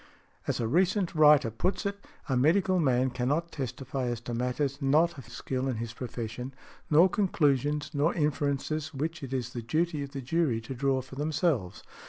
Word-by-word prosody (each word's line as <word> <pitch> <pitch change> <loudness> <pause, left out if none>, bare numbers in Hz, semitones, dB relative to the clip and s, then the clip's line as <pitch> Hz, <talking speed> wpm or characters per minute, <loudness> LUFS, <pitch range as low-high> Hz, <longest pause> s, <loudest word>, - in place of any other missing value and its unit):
As - - 0
a 115 - 0
recent 185 - +2
writer 150 -6 +6
puts 180 - -1
it, 200 0 -3 0.2
a 130 - 0
medical 180 +8 +3
man 130 -4 +2
cannot 145 +8 -1
testify 130 -1 -4
as 120 -1 -2
to 120 0 -5
matters 130 +4 -1
not 155 +5 +3
of 125 - -12
skill 130 +2 -3
in 130 - -1
his 115 0 -5
profession, 125 +1 -6 0.3
nor 160 +4 +7
conclusions, 150 - +1
nor 150 +3 +2
inferences 150 0 -1
which 160 +5 -3
it 135 -2 -7
is 125 -2 -3
the 120 - -4
duty 155 +6 0
of 140 - -5
the 135 - -4
jury 140 -3 +1
to 115 +4 -6
draw 135 0 +1
for 130 +1 -14
themselves. 150 - -1
140 Hz, 180 wpm, -29 LUFS, 125-155 Hz, 0.3 s, nor